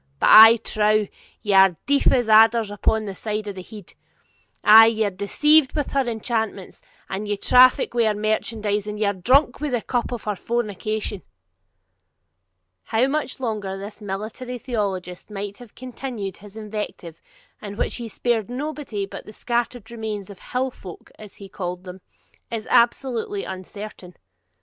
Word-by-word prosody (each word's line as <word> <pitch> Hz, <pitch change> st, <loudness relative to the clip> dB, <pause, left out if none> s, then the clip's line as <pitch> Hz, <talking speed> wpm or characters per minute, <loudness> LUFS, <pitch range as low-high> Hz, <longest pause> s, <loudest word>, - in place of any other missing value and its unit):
But, -, -, +3 dB
I 225 Hz, +2 st, +10 dB
trow, 215 Hz, -1 st, +1 dB, 0.4 s
ye 205 Hz, -, 0 dB
are 190 Hz, -3 st, +6 dB
deaf 280 Hz, 0 st, +3 dB
as 245 Hz, -3 st, +1 dB
adders 220 Hz, 0 st, +5 dB
upon 215 Hz, +2 st, 0 dB
that 200 Hz, -, -5 dB
side 215 Hz, -1 st, -3 dB
of 205 Hz, -, -4 dB
the 190 Hz, -, -8 dB
head; 205 Hz, 0 st, -12 dB, 0.7 s
ay, 225 Hz, +1 st, +9 dB
ye 220 Hz, -1 st, +1 dB
are 205 Hz, -, -1 dB
deceived 270 Hz, +10 st, +3 dB
with 295 Hz, -3 st, -2 dB
her 275 Hz, -2 st, 0 dB
enchantments, 220 Hz, -4 st, -3 dB, 0.3 s
and 200 Hz, +2 st, -5 dB
ye 205 Hz, 0 st, -1 dB
traffic 250 Hz, +5 st, +5 dB
with 235 Hz, -2 st, +2 dB
her 215 Hz, -, +1 dB
merchandise, 215 Hz, -1 st, -1 dB
and 210 Hz, 0 st, -5 dB
ye 215 Hz, -, +1 dB
are 200 Hz, -, +1 dB
drunk 250 Hz, -, +2 dB
with 295 Hz, -4 st, -2 dB
the 240 Hz, -, 0 dB
cup 245 Hz, -1 st, -2 dB
of 240 Hz, -, -5 dB
her 210 Hz, -1 st, -2 dB
fornication!' 215 Hz, -2 st, -3 dB, 1.6 s
How 225 Hz, +3 st, +1 dB
much 280 Hz, -1 st, -2 dB
longer 210 Hz, -6 st, -3 dB
this 205 Hz, +3 st, -9 dB
military 215 Hz, +5 st, -6 dB
theologist 200 Hz, -8 st, -4 dB
might 205 Hz, -1 st, -6 dB
have 240 Hz, -4 st, -14 dB
continued 245 Hz, -6 st, -6 dB
his 205 Hz, +2 st, -14 dB
invective, 210 Hz, -6 st, -7 dB, 0.4 s
in 205 Hz, -1 st, -8 dB
which -, -, -2 dB
he 235 Hz, -, -6 dB
spared 230 Hz, -1 st, -1 dB
nobody 265 Hz, -6 st, -4 dB
but 195 Hz, -, -10 dB
the -, -, -9 dB
scattered 240 Hz, 0 st, -3 dB
remnant 215 Hz, -4 st, -5 dB
of 195 Hz, -, -13 dB
HILL 255 Hz, +1 st, -3 dB
FOLK, 185 Hz, -7 st, -12 dB
as 210 Hz, -2 st, -12 dB
he 200 Hz, -, -11 dB
called 180 Hz, -1 st, -6 dB
them, 185 Hz, 0 st, -10 dB, 0.5 s
is 225 Hz, -2 st, -5 dB
absolutely 235 Hz, -4 st, +1 dB
uncertain. 190 Hz, -1 st, -9 dB
215 Hz, 165 wpm, -22 LUFS, 200-240 Hz, 1.6 s, I